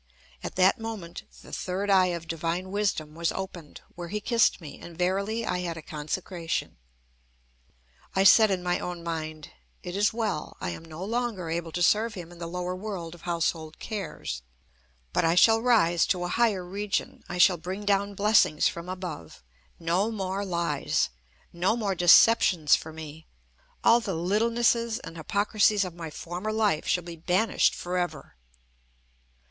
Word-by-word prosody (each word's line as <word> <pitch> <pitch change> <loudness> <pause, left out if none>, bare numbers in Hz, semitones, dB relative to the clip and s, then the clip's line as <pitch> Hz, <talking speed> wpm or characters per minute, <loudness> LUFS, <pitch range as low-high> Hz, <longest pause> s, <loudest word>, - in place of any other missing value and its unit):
At - - -6
that 185 +3 +4
moment 215 -7 -6 0.2
the - - -13
third 195 +2 -2
eye 185 -1 +5
of 170 -2 -4
divine 165 +3 -3
wisdom 195 -7 -1
was 165 +1 -1
opened, 180 -5 -7
where 175 -1 -7
he 210 +5 -3
kissed 230 +1 +2
me, 155 -5 -10
and 170 -1 -11
verily 200 +5 0
I 180 - -1
had 170 -2 -4
a 160 - -8
consecration. 165 +3 -4 1.4
I 190 - +4
said 220 +2 +7
in 185 -2 -1
my 175 0 0
own 175 -1 -5
mind: 155 -2 -5 0.3
"It 175 - -5
is 205 +1 +3
well. 220 -9 -3
I 90 - -3
am 125 - -8
no 165 +3 -7
longer 220 -7 -2
able 165 0 -3
to 175 - 0
serve 215 +4 +3
him 175 -2 -8
in 175 - -13
the 170 - -5
lower 180 +1 -3
world 185 -4 -5
of 175 - -13
household 165 -2 -2
cares. 190 - -5 0.7
But - - +2
I 165 +1 +3
shall 225 +4 +6
rise 205 -9 +3
to 180 -2 0
a 175 - -2
higher 210 -6 +1
region. 200 +3 -3
I 175 - -4
shall 180 0 +6
bring 185 +5 -6
down 200 0 +1
blessings 200 -7 +4
from 170 +1 -5
above. 180 - -7 0.4
No 175 +6 +1
more 195 -2 -3
lies! 170 - 0 0.4
No 185 +7 +1
more 205 -4 0
deceptions 175 -2 +6
for 160 - -6
me! 160 0 -10 0.6
All 235 - +6
the 200 -6 -3
littlenesses 230 +5 +1
and 165 - -8
hypocrisies 205 +4 +2
of 180 - -6
my 165 -1 -7
former 175 +7 -5
life 210 -8 +1
shall 180 - +1
be 170 0 -8
banished 180 +7 +2
for 180 +1 -2
ever!" 175 0 -4
180 Hz, 165 wpm, -27 LUFS, 170-205 Hz, 1.4 s, said